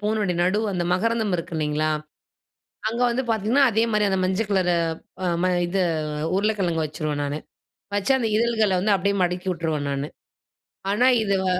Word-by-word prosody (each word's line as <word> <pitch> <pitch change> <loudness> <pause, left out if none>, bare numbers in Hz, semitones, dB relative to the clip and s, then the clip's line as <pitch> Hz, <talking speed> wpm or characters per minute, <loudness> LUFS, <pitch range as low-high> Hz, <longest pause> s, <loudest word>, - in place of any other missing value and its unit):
பூவு 210 +1 0 0.2
நடு, 185 +4 +2
அந்த 175 -2 -1
மகரந்தம் 220 +2 +1
இருக்கு 170 0 -6
இல்லைங்களா? 155 0 0 1.0
அங்க 235 +2 -2
வந்து 255 +3 -1
பார்த்தீங்கன்னா, 225 +6 +2
அதே 220 +1 +2
மாரி 210 -1 +2
அந்த 190 - +1
மஞ்சள் 190 +3 0
கலரு 180 -2 +2 0.5
ஆ, - - 0 0.2
ம - - +3 0.2
இது 190 +2 0 0.5
உருளைக்கிழங்கு 195 -5 0
வெச்சுறுவேன் 150 -1 -3
நானு. 145 +1 -3 0.6
வச்சு, 205 +6 +1
அந்த 235 - 0
இதழ்களை 220 -3 +2
வந்து 205 +2 +2
அப்படியே 200 +2 0
மடக்கி 180 +1 -2
விட்டுருவேன் 160 -4 -2
நானு. 140 +1 -2 0.8
ஆனா, 240 +5 +3 0.2
இதுவ 195 -2 0
195 Hz, 155 wpm, -24 LUFS, 170-220 Hz, 1.0 s, ம